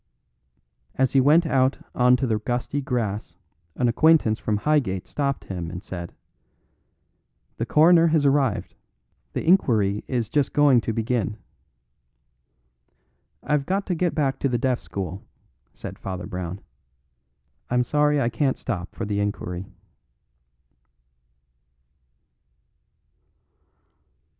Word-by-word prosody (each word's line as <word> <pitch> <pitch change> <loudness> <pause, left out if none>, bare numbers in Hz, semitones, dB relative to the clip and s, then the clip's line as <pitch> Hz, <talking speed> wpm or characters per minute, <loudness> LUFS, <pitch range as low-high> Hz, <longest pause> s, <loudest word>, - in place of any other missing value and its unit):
As 130 -1 +1
he 135 - +4
went 155 +6 +5
out 135 -3 +2 0.2
on 125 0 +4
to 125 - -1
the 110 -3 0
gusty 120 +6 -2
grass 110 - -3 0.4
an 125 - +1
acquaintance 120 -3 +3
from 105 -1 -1
Highgate 110 -8 0
stopped 140 -2 -2
him 90 -3 -5
and 90 +2 -7
said: 85 -4 -7 1.4
"The - - -3
Coroner 165 +2 +5
has 155 -3 +2
arrived. 135 -6 +1 0.6
The - - -3
inquiry 110 - +3
is 120 -4 -1
just 145 +3 0
going 145 -5 +5
to 115 - -2
begin." 110 -2 -1 2.1
"I've 150 -2 0
got 195 +2 0
to 185 - -1
get 175 0 -1
back 140 -4 0
to 140 - 0
the 120 - 0
Deaf 125 0 0
School," 95 0 -6 0.5
said - - -9
Father 95 -2 -5
Brown. 90 0 -5 1.1
"I'm 125 0 +2
sorry 150 +3 +2
I 120 -4 +1
can't 130 +3 0
stop 95 -7 -5
for 110 - -4
the 100 -1 -2
inquiry." 95 -2 -3
125 Hz, 120 wpm, -24 LUFS, 100-145 Hz, 2.1 s, went